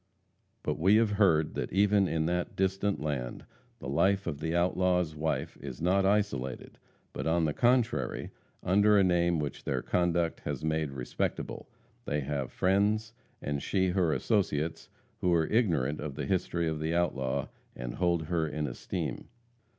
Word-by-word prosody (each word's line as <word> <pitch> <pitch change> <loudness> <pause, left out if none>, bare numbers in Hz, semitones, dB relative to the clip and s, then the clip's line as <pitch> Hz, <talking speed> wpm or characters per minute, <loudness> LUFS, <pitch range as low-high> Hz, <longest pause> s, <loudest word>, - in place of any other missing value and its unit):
But - - -2
we 95 +6 +5
have 110 -1 +4
heard 90 -7 +3
that - - -3
even 100 +1 +3
in 80 -2 0
that 90 +1 -1
distant 95 +1 0
land 70 -5 -4 0.3
the - - -8
life 95 +8 +2
of 75 -4 -3
the 80 +1 -2
outlaw's 90 -2 +1
wife 80 +1 -2
is 65 -3 -7
not 95 +3 +2
isolated, 95 -12 -1 0.3
but, - - -3
on 80 0 +2
the 75 - 0
contrary, 120 +1 +1 0.3
under 105 +3 +4
a 100 - +5
name 85 -2 +2
which 75 -2 -4
their - - -2
conduct 85 -1 +1
has - - -4
made 80 -1 0
respectable, 60 -2 -3 0.4
they 75 +1 -1
have 70 -2 -3
friends, 105 +4 +1 0.3
and 70 -1 -2
she 95 -1 +1
her 90 -3 +2
associates, 80 -6 0 0.3
who 90 - +1
are 80 -1 +3
ignorant 80 - +1
of 75 -2 -5
the 75 -1 -3
history 85 0 0
of 80 -1 -2
the 80 +2 -1
outlaw, 70 -7 0 0.3
and - - -5
hold 85 -3 +1
her 80 0 0
in 75 0 -3
esteem. - - -4
85 Hz, 160 wpm, -30 LUFS, 75-95 Hz, 0.4 s, we